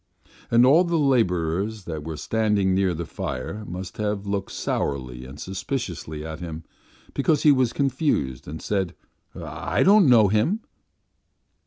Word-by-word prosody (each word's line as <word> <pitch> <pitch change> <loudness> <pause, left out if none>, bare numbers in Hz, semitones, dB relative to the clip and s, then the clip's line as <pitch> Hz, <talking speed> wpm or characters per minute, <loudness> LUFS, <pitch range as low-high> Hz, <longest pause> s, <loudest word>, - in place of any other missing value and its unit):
And 120 +1 +5
all 150 +7 +6
the 170 -1 0
labourers 105 - +1
that 80 -4 -5
were 80 0 -5
standing 105 -3 +1
near 95 -2 +1
the 85 +1 -4
fire 80 +10 -5
must 90 +1 -7
have 105 -1 -2
looked 100 -1 -3
sourly 65 -3 -3
and 70 +3 -11
suspiciously 95 - -4
at 80 0 -6
him, 80 -2 -6 0.5
because 150 +2 +1
he 150 - +7
was 130 -4 +3
confused 130 - -1
and 80 +2 -7
said: 95 -4 -1 0.4
'I - - -2
don't 195 -5 +6
know 115 -4 +7
Him. 110 - +1
100 Hz, 145 wpm, -24 LUFS, 80-125 Hz, 0.5 s, he